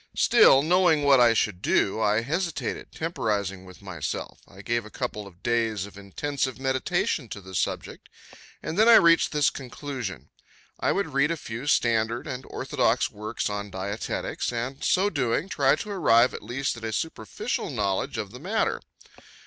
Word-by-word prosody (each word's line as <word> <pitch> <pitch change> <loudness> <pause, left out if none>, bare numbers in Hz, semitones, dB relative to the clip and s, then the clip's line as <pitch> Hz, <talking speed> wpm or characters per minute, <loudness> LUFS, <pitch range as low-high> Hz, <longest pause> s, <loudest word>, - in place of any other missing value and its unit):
Still, 135 +1 +6
knowing 175 -2 +3
what 140 -2 +6
I 120 -1 +5
should 100 -4 0
do, 100 +1 +1
I 105 +1 +2
hesitated, 165 +6 -3
temporizing 100 - -2
with 90 +1 -14
myself. 85 -7 -5
I 95 +1 -14
gave 120 +2 -1
a 110 - -11
couple 105 -1 -5
of 90 -1 -18
days 115 -4 0
of 100 - -13
intensive 130 +7 -3
meditation 135 - -1
to 105 - -6
the 95 -1 -12
subject, - - -3 0.5
and 165 - -3
then 220 +2 +6
I 230 - +10
reached 170 -3 +5
this 150 -2 +2
conclusion: 130 - -7 0.5
I - - +1
would 195 -7 -1
read 140 +2 +3
a 170 - -1
few 120 0 -7
standard 115 -3 +1
and 130 0 -6
orthodox - - 0
works 105 +2 -4
on 105 0 -4
dietetics, 100 +6 -3
and, 125 +3 -4
so 195 +3 +2
doing, 135 +3 0
try 140 -5 +3
to 205 +7 -6
arrive 125 -10 +4
at - - -6
least 125 +5 -2
at 115 - -11
a 110 - -3
superficial 110 -7 -3
knowledge 100 -2 -1
of 100 - -4
the 125 - -10
matter. 200 +9 -1
120 Hz, 170 wpm, -26 LUFS, 105-145 Hz, 0.5 s, I